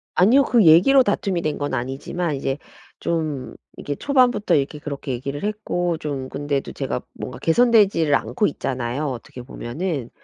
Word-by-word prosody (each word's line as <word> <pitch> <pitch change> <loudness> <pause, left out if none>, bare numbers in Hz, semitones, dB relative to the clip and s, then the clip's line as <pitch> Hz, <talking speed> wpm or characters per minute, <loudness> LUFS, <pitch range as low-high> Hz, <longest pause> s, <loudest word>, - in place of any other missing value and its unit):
아니요. 230 +10 +5
그 235 -6 +3
얘기로 195 +13 +7
다툼이 200 -5 0
된 155 -2 -1
건 145 -1 -2
아니지만 135 +6 -3
이제 135 0 -2 0.4
좀 155 -6 -2 0.2
이게 145 - -4
초반부터 250 - +2
이렇게 145 +1 0
그렇게 140 -2 -5
얘기를 140 +5 -4
했고 175 -5 -1
좀 140 -4 -4
근데도 145 -1 -3
제가 135 -2 -3
뭔가 125 - -7
개선되지 200 -5 +3
않고 120 - +1
있잖아요 130 +1 -3
어떻게 125 -1 -7
보면은. 135 +2 -4
150 Hz, 350 characters per minute, -22 LUFS, 135-190 Hz, 0.4 s, 얘기로